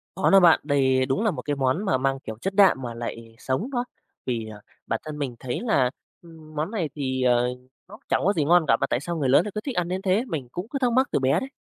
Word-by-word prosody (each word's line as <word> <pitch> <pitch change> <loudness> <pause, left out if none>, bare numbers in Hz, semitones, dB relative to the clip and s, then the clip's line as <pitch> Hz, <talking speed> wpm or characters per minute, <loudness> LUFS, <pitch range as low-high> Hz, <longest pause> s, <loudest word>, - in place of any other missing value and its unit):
Có 190 - +2
đó 195 - +7
bạn. 170 -3 +6
Đây 130 -3 +2
đúng 140 - -1
là 215 - +2
một 130 - -6
cái 145 +1 -2
món 135 +9 0
mà 190 - +2
mang 135 +1 -1
kiểu 110 -4 -7
chất 195 - -2
đạm 195 -10 +5
mà 120 -2 -5
lại 115 -1 -7
sống 135 - -2
đó, 245 -1 -1 0.4
vì, 115 -3 -2
ờ, 105 -1 -10 0.3
bản 115 - -1
thân 150 -1 -6
mình 135 -4 -3
thấy 125 -2 -4
là, 135 - +2 0.3
ừm, 160 -2 -15
món 155 +7 -2
này 175 -9 -2
thì, 130 -2 -2
ờ, 125 -1 +3 0.4
nó 210 - -12
chẳng - - +2
có 200 - +3
gì 150 -5 0
ngon 175 0 +4
cả, 115 - +4
mà - - +1
tại 120 - +1
sao 170 +3 -4
người 135 -4 0
lớn 135 - +5
lại 210 - -4
cứ 215 - -2
thích 270 -1 -5
ăn 175 -1 0
đến 185 +1 -3
thế? 195 +5 +1
Mình 145 - -4
cũng 180 +5 -5
cứ 275 - -3
thắc 250 -2 +2
mắc 260 +3 +3
từ - - +1
bé 135 +5 +2
đấy. 265 - -6
150 Hz, 285 wpm, -25 LUFS, 130-190 Hz, 0.4 s, đó